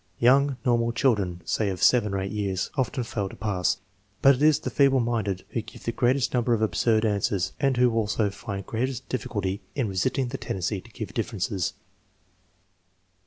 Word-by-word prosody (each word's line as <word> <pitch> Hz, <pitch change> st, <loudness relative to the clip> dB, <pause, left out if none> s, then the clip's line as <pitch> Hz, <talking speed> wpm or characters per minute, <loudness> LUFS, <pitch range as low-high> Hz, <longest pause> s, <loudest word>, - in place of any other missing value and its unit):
Young 135 Hz, +2 st, +4 dB
normal 120 Hz, -1 st, +2 dB
children, 105 Hz, -9 st, +1 dB
say 105 Hz, -3 st, 0 dB
of 95 Hz, -2 st, -3 dB
7 115 Hz, -5 st, +4 dB
or 100 Hz, -, -1 dB
8 95 Hz, 0 st, -3 dB
years, 100 Hz, -3 st, -2 dB
often 130 Hz, -2 st, -1 dB
fail 115 Hz, -5 st, -3 dB
to -, -, -11 dB
pass, 95 Hz, -2 st, 0 dB, 0.5 s
but 140 Hz, -, +8 dB
it 130 Hz, -, -4 dB
is 155 Hz, -1 st, +5 dB
the -, -, -5 dB
feeble 135 Hz, -2 st, +4 dB
minded 110 Hz, -6 st, -1 dB
who 115 Hz, -, -2 dB
give 110 Hz, -, -13 dB
the 115 Hz, -, -1 dB
greatest 125 Hz, +3 st, +1 dB
number 120 Hz, -1 st, +2 dB
of 110 Hz, -, -3 dB
absurd 110 Hz, +3 st, +2 dB
answers 100 Hz, -3 st, 0 dB
and 135 Hz, -2 st, +2 dB
who 125 Hz, -1 st, +4 dB
also 105 Hz, -2 st, +1 dB
find 100 Hz, -1 st, -6 dB
greatest 125 Hz, +2 st, -3 dB
difficulty 100 Hz, -6 st, -2 dB
in 130 Hz, -5 st, 0 dB
resisting 120 Hz, +7 st, 0 dB
the 135 Hz, -, -5 dB
tendency 95 Hz, +1 st, -2 dB
to 115 Hz, -, -17 dB
give 110 Hz, -2 st, -7 dB
differences. 100 Hz, -5 st, -2 dB
115 Hz, 180 wpm, -26 LUFS, 100-125 Hz, 0.5 s, but